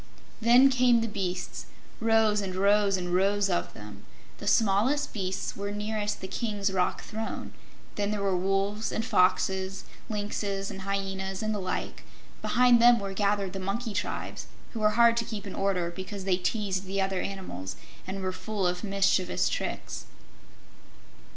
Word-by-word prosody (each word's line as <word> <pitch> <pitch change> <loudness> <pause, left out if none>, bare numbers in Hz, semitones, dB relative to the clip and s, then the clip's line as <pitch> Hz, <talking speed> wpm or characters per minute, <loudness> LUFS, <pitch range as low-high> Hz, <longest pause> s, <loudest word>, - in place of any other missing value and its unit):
Then 245 +4 +7
came 250 -2 +4
the 230 - -1
beasts 185 -4 -4 0.3
rows 220 -2 +3
and 190 -2 -4
rows 200 0 +3
and 180 -1 -3
rows 195 +1 +2
of 175 - -1
them! 105 -1 -10 0.4
The - - -7
smallest 225 +8 +2
beasts 190 -2 -3
were 200 0 -4
nearest 210 0 -2
the 190 - -4
King's 205 -2 -1
rock 180 -1 0
throne; 220 0 -5 0.4
then 205 -1 0
there 210 -1 -2
were 195 -2 +2
wolves 195 +3 0
and 225 - -2
foxes, 190 -1 +2 0.3
lynxes 205 -1 -2
and 195 -1 -7
hyenas, 195 0 -3
and 215 0 0
the 210 - -2
like; 185 - -3 0.4
behind 245 -1 +5
them 240 0 +7
were 195 -1 -4
gathered 200 -1 0
the 195 - -4
monkey 210 +4 -3
tribes, 205 - -4 0.3
who 230 - -4
were 215 +1 +2
hard 235 0 +6
to 235 - +2
keep 215 -3 -6
in 195 - -6
order 185 -3 0
because 190 +2 -6
they 185 -1 +2
teased 195 0 -1
the 195 +1 -2
other 190 -1 0
animals 140 - -5 0.3
and 190 0 -4
were 185 - 0
full 195 +1 -3
of 180 +2 0
mischievous 195 -2 +2
tricks. - - -4
200 Hz, 165 wpm, -28 LUFS, 190-215 Hz, 0.4 s, Then